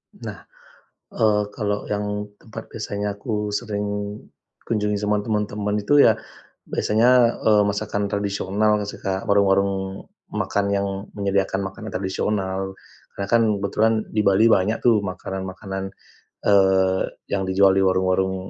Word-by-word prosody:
Nah, - - -8 0.8
eee, 105 -2 +3
kalau 105 -3 -2
yang 105 0 -2
tempat 110 0 -9
biasanya 105 -2 -3
aku 105 0 -3
sering 105 -2 -2 0.8
kunjungi 105 -2 0
sama 105 0 +1
teman-teman 105 -1 -1
itu, 140 +8 +5
ya - - +4 0.5
biasanya, 110 +4 +3 0.3
eee, 105 -1 +5
masakan 100 0 -1
tradisional, 100 +1 0
suka 95 -1 -3
warung-warung 100 -1 +3 0.6
makan 100 0 -1
yang 100 0 0 0.3
menyediakan 100 -1 0
makanan 110 +3 -9
tradisional. 95 0 -2 0.4
Karena 100 - -4
kan 115 0 +5 0.2
kebetulan 105 +3 +1 0.2
di 105 - +2
Bali 100 +3 +5
banyak 105 +2 +2
tuh, 115 -3 +5
makanan-makanan, 95 0 -5 0.6
eee, 95 -1 +4 0.3
yang 95 -1 0
dijual 95 0 +5
di 95 - +4
warung-warung, 95 0 +1
100 Hz, 120 wpm, -23 LUFS, 95-105 Hz, 0.8 s, itu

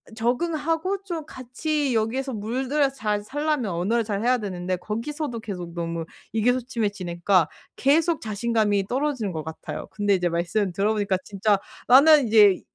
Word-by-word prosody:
적응하고 325 - -1
좀 335 -5 -4
같이 275 +1 -2
여기에서 255 +5 -1
물들여서 265 +6 0
잘 210 -4 -1
살려면 290 -3 -1
언어를 200 +8 0
잘해야 225 +4 +1
되는데 185 -4 -3
거기서도 235 - -4
계속 180 -6 -6
너무 170 -1 -3 0.3
의기소침해지니까 205 - +1 0.3
계속 320 +4 +2
자신감이 215 -2 0
떨어지는 260 -6 -1
것 160 -2 -4
같아요. 160 0 -7
근데 205 -1 +1
이제 180 -2 +1
말씀 175 +4 0
들어보니까 200 0 +1
진짜 200 0 +1 0.3
나는 280 +1 +7
이제 210 -4 +6
220 Hz, 355 characters per minute, -24 LUFS, 195-270 Hz, 0.3 s, 나는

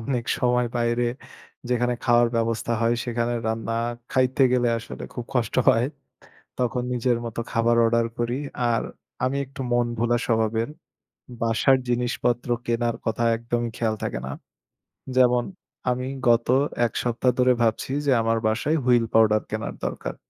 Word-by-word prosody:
অনেকসময় 125 0 0
বাইরে 120 +1 +1 0.6
যেখানে 125 0 +1
খাওয়ার 120 -1 +4
ব্যবস্থা 115 0 0
হয় 115 +1 +2
সেখানে 120 0 -1
রান্না 110 0 -2 0.4
খাইতে 130 +1 +2
গেলে 125 -1 +3
আসলে 115 - -8
খুব 120 - -5
কষ্ট 120 -2 0
হয়। 115 +3 +4 0.7
তখন 125 0 0
নিজের 120 -1 +1
মতো 115 0 -4
খাবার 115 0 +2
অর্ডার 115 0 +2
করি। 120 +1 0 0.4
আর 115 - +1 0.4
আমি 130 +2 0
একটু 135 +1 -11
মন 120 0 +3
ভোলা 120 +1 +2
স্বভাবের। 115 0 +1 0.7
বাসার 115 +4 +3
জিনিসপত্র 120 0 0 0.2
কেনার 115 0 0
কথা 110 +1 -1
একদমই 120 0 -2
খেয়াল 110 -2 0
থাকে - - -2
না। 70 - -5 0.8
যেমন 125 -1 +4 0.5
আমি 125 +1 -2 0.2
গত 115 0 +3 0.4
এক 115 - -3
সপ্তাহ 125 +1 +1
ধরে 125 0 +5
ভাবছি 115 +3 0
যে 140 - +3
আমার 115 0 +1
বাসায় 135 +9 +1
Wheel 120 -2 +4
পাউডার 110 -1 +5
কেনার 110 +1 -4
দরকার। - - -4
120 Hz, 140 wpm, -24 LUFS, 115-125 Hz, 0.8 s, ধরে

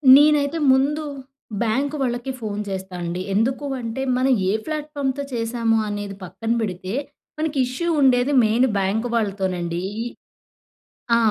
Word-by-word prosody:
నేనైతే 295 +1 +5
ముందు 285 +4 +2 0.6
బ్యాంక్ 265 +6 +1
వాళ్ళకి 245 +1 -1
ఫోన్ 210 -3 -4
జేస్తా 190 -1 -5
అండి. 175 +2 -3
ఎందుకు 255 +7 +1 0.2
అంటే 230 +2 -4 0.2
మన 255 +1 +2 0.2
ఏ - - +3
ఫ్లాట్‌ఫామ్‌తో 290 -3 -2
చేశాము 230 -1 +1
అనేది 205 -1 -4
పక్కన 225 +5 -4
పెడితే, 185 -2 -3 0.5
మనకి 310 -2 -1
ఇష్యూ 255 +8 -3
ఉండేది 255 0 +4
మెయిన్ 230 +4 +3
బ్యాంక్ 200 +4 0
వాళ్ళతోనండి. 190 -5 -1 0.2
ఈ - - -6 1.1
ఆ! - - +5
235 Hz, 125 wpm, -22 LUFS, 200-275 Hz, 1.1 s, నేనైతే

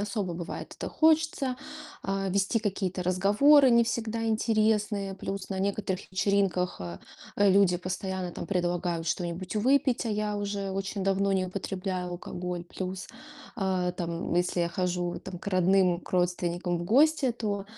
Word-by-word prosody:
особо 200 -4 -2
бывает 170 0 -6
это - - -4
хочется, 315 -5 +2 0.5
а, 195 0 -1
вести 195 +4 +1
какие-то 190 -4 -2
разговоры 210 +10 +5
не 235 0 +5
всегда 225 0 -2
интересные. 215 -3 +1
Плюс 195 0 -5
на 195 - -3
некоторых 195 -1 -2
вечеринках, 190 -2 +1
э, 85 -1 -6 0.4
люди 195 -2 +5
постоянно 185 0 -4
там - - -6
предлагают 175 -2 -1
что-нибудь 175 +2 -3
выпить, 260 +3 +2
а - - -1
я 210 0 -1
уже 200 -1 -3
очень 195 0 -3
давно 195 0 +2
не 190 -1 +1
употребляю 185 -1 -3
алкоголь. 175 0 -5
Плюс, 185 +2 -5 0.5
а, 185 -3 0
там, 170 -1 -3
если 175 0 +1
я 170 - +1
хожу 180 -1 -2
там 180 - -8
к - - -13
родным, 185 -2 +3
к - - -14
родственникам 175 0 0
в 175 - -4
гости, 280 - +4
то 205 -4 -3
195 Hz, 150 wpm, -28 LUFS, 180-210 Hz, 0.5 s, разговоры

